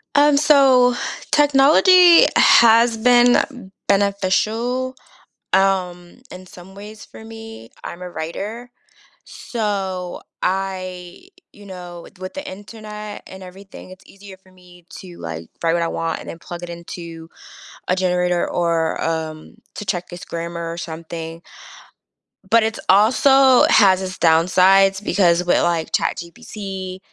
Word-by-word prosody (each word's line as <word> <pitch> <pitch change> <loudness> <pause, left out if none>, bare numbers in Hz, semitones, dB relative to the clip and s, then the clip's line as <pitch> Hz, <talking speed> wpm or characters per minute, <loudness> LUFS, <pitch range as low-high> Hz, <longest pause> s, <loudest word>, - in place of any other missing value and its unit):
Um, 290 0 +4
so 265 -4 +4 0.4
technology 310 +5 +5
has 230 0 +5
been 245 -2 +2 0.2
beneficial, 215 +6 -1 0.6
um, 185 +1 -1
in 185 0 -11
some 180 +1 -15
ways 210 +2 -12
for 220 - -14
me. 225 - -12
I'm 170 - -8
a 180 - -7
writer, 205 +10 -7 0.5
so 195 -5 -5 0.2
I 185 - -4 0.2
you 205 0 -16
know, 175 -2 -10
with 190 - -17
with 185 0 -8
the 285 0 -7
Internet 210 +1 -10
and 190 0 -12
everything, 185 +1 -13
it's 185 0 -15
easier 195 -1 -14
for 190 0 -25
me 180 -1 -20
to, 180 -2 -12
like, 80 0 -8 0.2
write 165 - +2
what 170 0 0
I 165 - -1
want 165 0 -4
and - - -12
then 165 - -8
plug 175 +1 -10
it 175 - -7
into 170 -1 -10 0.6
a 185 - +1
generator 180 -1 0
or 170 -2 -1
um, 160 +4 -5 0.2
to 210 - -7
check 180 -1 -2
it's 175 +3 -9
grammar 170 0 -6
or 165 - -6
something 165 0 -8 1.1
but 230 -1 +4
it's 220 0 -3
also 255 +6 +5
has 190 -3 +4
its 185 0 -6
downsides 190 +4 +3
because 180 -3 +2
with, 175 - +1
like, 170 -2 -1
ChatGPT 190 0 -5
190 Hz, 135 wpm, -19 LUFS, 175-220 Hz, 1.1 s, technology